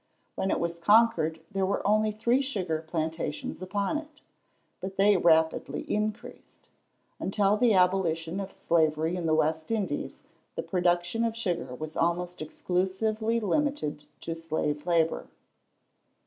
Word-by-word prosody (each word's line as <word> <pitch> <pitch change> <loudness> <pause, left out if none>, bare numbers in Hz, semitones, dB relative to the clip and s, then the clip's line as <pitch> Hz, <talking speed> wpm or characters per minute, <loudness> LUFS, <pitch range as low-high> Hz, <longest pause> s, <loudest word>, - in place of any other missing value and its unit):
When 190 - -1
it - - +1
was 170 0 -2
conquered 205 -5 +4
there 195 -2 -1
were 195 +1 0
only 215 +1 +3
three 235 +5 +2
sugar 185 - -2
plantations 160 0 -3
upon 200 +9 -1
it. 305 -1 -14 0.6
But 190 +1 -6
they 200 +1 +5
rapidly 160 -2 +2
increased. 215 +3 -4 0.5
Until 200 +1 +2
the 220 -1 +3
abolition 180 -2 +2
of 195 -1 -5
slavery 160 0 +1
in 175 -2 -2
the 155 - +3
West 155 0 0
Indies, 215 -4 -2 0.3
the - - -3
production 175 +3 +1
of 230 -1 -1
sugar 175 - -2
was 155 +3 -7
almost 175 +1 -1
exclusively 200 +8 -1
limited 225 - -1 0.2
to 165 - -3
slave 150 -1 -2
labour. 165 -2 +1
185 Hz, 135 wpm, -28 LUFS, 160-215 Hz, 0.6 s, they